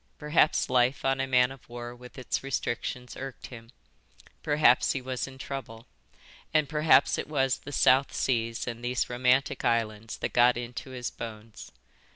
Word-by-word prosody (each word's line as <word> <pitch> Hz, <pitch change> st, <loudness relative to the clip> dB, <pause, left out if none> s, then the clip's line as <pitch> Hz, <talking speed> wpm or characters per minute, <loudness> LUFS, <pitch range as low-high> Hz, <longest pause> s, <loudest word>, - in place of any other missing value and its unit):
Perhaps 150 Hz, +1 st, +2 dB
life 125 Hz, +2 st, +2 dB
on 135 Hz, 0 st, +1 dB
a 135 Hz, -, -1 dB
man 125 Hz, -1 st, +3 dB
of 135 Hz, -3 st, -14 dB
war 120 Hz, 0 st, -7 dB
with 125 Hz, +2 st, -14 dB
its 130 Hz, -, -3 dB
restrictions 125 Hz, -2 st, -4 dB
irked 135 Hz, -1 st, -8 dB
him, 115 Hz, -2 st, -11 dB, 0.7 s
perhaps 145 Hz, -5 st, +3 dB
he 135 Hz, -, -2 dB
was 130 Hz, 0 st, -4 dB
in 135 Hz, 0 st, -11 dB
trouble, 130 Hz, -4 st, -7 dB, 0.7 s
and 155 Hz, -2 st, +2 dB
perhaps 155 Hz, +1 st, +4 dB
it -, -, -4 dB
was 135 Hz, -3 st, 0 dB
the 145 Hz, -, -10 dB
South 135 Hz, 0 st, +4 dB
Seas 115 Hz, -3 st, -1 dB
and 120 Hz, -1 st, -6 dB
these 125 Hz, 0 st, -1 dB
romantic 125 Hz, +2 st, +1 dB
islands 115 Hz, -1 st, -1 dB
that -, -, -4 dB
got 120 Hz, 0 st, +5 dB
into 120 Hz, +2 st, -6 dB
his 125 Hz, -2 st, -5 dB
bones. 110 Hz, -1 st, -9 dB
125 Hz, 165 wpm, -28 LUFS, 120-135 Hz, 0.7 s, got